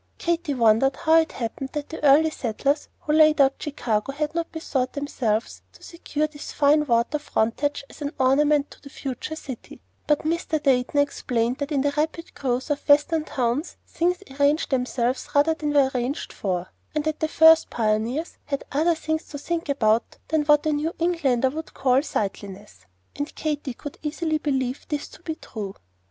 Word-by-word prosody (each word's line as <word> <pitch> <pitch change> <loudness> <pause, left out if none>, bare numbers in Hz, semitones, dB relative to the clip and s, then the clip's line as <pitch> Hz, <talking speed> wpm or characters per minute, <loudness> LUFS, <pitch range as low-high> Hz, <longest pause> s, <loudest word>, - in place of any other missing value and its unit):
Katy 335 -4 -1
wondered 235 +3 +4
how 320 0 +4
it 320 - -1
happened 255 +3 -5
that 295 -1 -4
the 320 - -8
early 300 +3 +6
settlers 280 +3 -1
who 300 - -1
laid 310 -1 +5
out 275 -1 +4
Chicago 245 -6 -1
had 300 +2 -2
not 335 0 -2
bethought 270 -5 -2
themselves 245 -6 -2
to - - -18
secure 305 -3 -3
this 300 -1 -8
fine 300 +1 +3
water 235 +5 +2
frontage 285 +2 -1
as - - -15
an 285 0 -2
ornament 290 +2 +3
to - - -15
the 280 - -11
future 275 +2 -5
city; 265 -6 -9 0.3
but 295 -1 +2
Mr. 330 0 0
Dayton 255 0 +2
explained 245 -4 0
that 285 +1 -3
in 280 -2 +2
the 285 +1 0
rapid 320 +2 -2
growth 260 +1 -2
of 290 +1 -3
Western 305 +2 +4
towns, 255 +4 -2
things 360 +3 -1 0.2
arranged 290 +2 +2
themselves 250 -1 -1
rather 295 +3 +4
than 300 -2 -3
were 280 -2 +4
arranged 255 +3 -3
for, 185 -2 -3 0.2
and 305 - +1
that 310 0 -2
the 315 - +1
first 320 0 +6
pioneers 230 +8 -1
had 280 -1 -3
other 325 +4 +2
things 315 0 -2
to 285 - -8
think 330 +2 -3
about 225 -5 +1
than 315 -1 +2
what 295 0 +4
a 310 - +2
New 305 +3 -2
Englander 285 -8 +1
would 320 +3 -7
call 260 0 +3
"sightliness," 200 - -5 0.3
and 290 +1 -5
Katy 295 -4 -3
could 290 - -9
easily 310 +1 -1
believe 265 -3 -1
this 295 -2 -2
to - - -15
be 320 -2 -4
true. 205 -9 -7
290 Hz, 180 wpm, -24 LUFS, 255-310 Hz, 0.3 s, early